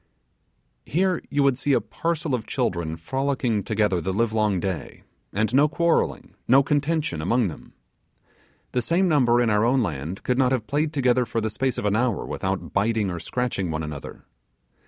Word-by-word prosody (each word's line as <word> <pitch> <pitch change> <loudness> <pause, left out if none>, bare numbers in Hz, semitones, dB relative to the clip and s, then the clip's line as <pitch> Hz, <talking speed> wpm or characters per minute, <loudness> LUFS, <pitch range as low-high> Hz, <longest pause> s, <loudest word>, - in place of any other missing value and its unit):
Here 185 +3 0
you 145 0 +1
would 135 -2 +2
see 140 +1 +1
a - - +4
parcel 165 -3 -3
of 115 -4 -2
children 85 - -1
frolicking 130 - -1
together 105 -4 +1
the 95 - -2
live 110 +3 0
long 105 -4 +1
day, 95 -2 -4 0.3
and 110 +4 0
no 145 +3 +5
quarrelling, 170 +2 0
no 135 +3 +6
contention, 145 - 0
among 115 +5 +1
them. 80 - -12 1.0
The 125 - 0
same 170 +9 +2
number 125 -7 +3
in 120 -2 +2
our 105 +1 +3
own 125 +2 +3
land 80 +1 -4
could 125 +1 0
not 130 -1 +3
have 120 -4 -1
played 150 +4 0
together 130 -4 +2
for 115 -1 -2
the 110 -1 -2
space 130 +2 -1
of - - -3
an 105 0 +2
hour 120 -5 0
without 95 0 -3
biting 105 -1 +1
or 85 - -4
scratching 100 0 -2
one 80 0 -2
another. 75 -2 -8
120 Hz, 180 wpm, -24 LUFS, 100-135 Hz, 1.0 s, no